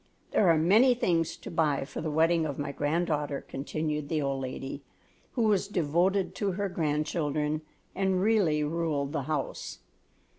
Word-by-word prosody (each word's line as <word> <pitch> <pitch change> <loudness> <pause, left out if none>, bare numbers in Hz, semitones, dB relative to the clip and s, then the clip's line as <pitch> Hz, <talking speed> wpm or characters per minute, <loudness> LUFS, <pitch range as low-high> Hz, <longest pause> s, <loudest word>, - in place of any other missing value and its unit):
There 195 - +4
are 165 - +5
many 215 +11 +5
things 170 -8 0
to - - -9
buy 150 -5 +1
for - - -6
the 160 - -2
wedding 160 +1 +3
of 140 - -5
my 145 -1 -3
granddaughter," 150 -1 -1
continued 150 +1 -3
the 160 - 0
old 135 -2 -1
lady, 135 +2 -5 0.5
who 240 - +1
was 210 -3 +2
devoted 180 +2 +1
to 200 -3 0
her 200 +1 -2
grandchildren 150 -2 -1 0.3
and 190 -1 +1
really 190 -7 +3
ruled 150 -3 -1
the 150 -2 -1
house. 150 -3 -3
160 Hz, 155 wpm, -29 LUFS, 150-180 Hz, 0.5 s, are